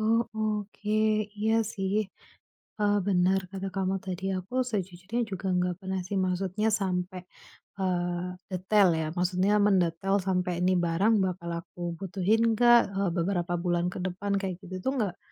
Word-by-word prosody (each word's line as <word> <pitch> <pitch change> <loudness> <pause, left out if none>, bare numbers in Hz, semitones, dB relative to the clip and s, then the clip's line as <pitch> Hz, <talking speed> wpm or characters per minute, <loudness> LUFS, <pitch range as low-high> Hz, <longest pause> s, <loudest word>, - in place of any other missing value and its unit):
oh, 225 +2 +3
oke. 210 0 -1 0.4
Iya 220 +1 +2 0.2
sih. 195 +1 0 0.7
Eee, 205 0 +3
benar 185 0 +3
kata 195 0 -4
kamu 190 0 0
tadi. 185 0 -5
Aku 245 +8 -1
sejujurnya 195 +3 -2
juga 190 0 -3
enggak 180 0 0
pernah 190 0 -2
sih. 200 - -4
Maksudnya 185 +3 0
sampai, 185 -3 -2 0.5
eee, 175 -1 -1 0.2
detail 190 +2 +3
ya, 160 - -1
maksudnya 185 +3 +2
mendetail 190 -1 +2
sampai 180 -2 0
ini 185 +1 +3
barang 175 +6 +2
bakal 175 -2 -3
aku 175 -1 -6
butuhin 205 +5 +1
enggak, 240 -1 +5
eee, 195 -2 +1
beberapa 175 0 0
bulan 175 0 0
kedepan 185 +2 -3
kayak 190 -2 -4
gitu 185 +1 -7
tuh 265 - +1
enggak 200 -6 -1
190 Hz, 145 wpm, -28 LUFS, 180-205 Hz, 0.7 s, enggak